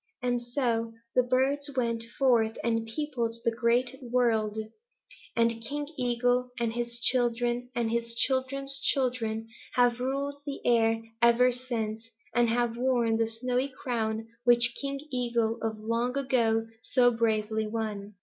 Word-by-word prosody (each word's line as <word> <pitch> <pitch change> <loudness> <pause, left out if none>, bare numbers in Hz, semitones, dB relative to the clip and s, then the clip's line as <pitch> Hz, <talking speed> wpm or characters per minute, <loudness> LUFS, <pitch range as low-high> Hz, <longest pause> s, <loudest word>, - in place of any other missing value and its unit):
And 245 -1 +1
so 240 -2 -1 0.2
the 255 - +5
birds 265 +4 +1
went 230 -2 +1
forth 235 -5 +3
and 225 -1 0
peopled 235 -2 -2
the 230 - +3
Great 240 +3 +1
World, 235 -4 +1 0.8
and 230 -1 +2
King 290 +4 -3
Eagle 245 -1 +1
and 230 -1 0
his 235 0 -3
children 240 0 +1
and 235 -2 0
his 235 0 -1
children's 275 +2 0
children 235 -5 0 0.3
have 245 -1 +3
ruled 275 +3 -2
the 285 -1 -5
air 225 -1 +3 0.2
ever 235 +2 +5
since 225 -3 -4 0.2
and 240 0 +3
have 235 0 0
worn 240 -3 +2
the 225 0 +1
snowy 250 +4 -1
crown 225 -4 -3 0.2
which 240 0 +5
King 275 0 -3
Eagle 235 -2 0
of 220 -1 -2
long 230 +4 -1
ago 230 -5 +1 0.2
so 250 -1 +3
bravely 220 -1 0
won." 210 -2 -4
240 Hz, 140 wpm, -28 LUFS, 225-250 Hz, 0.8 s, the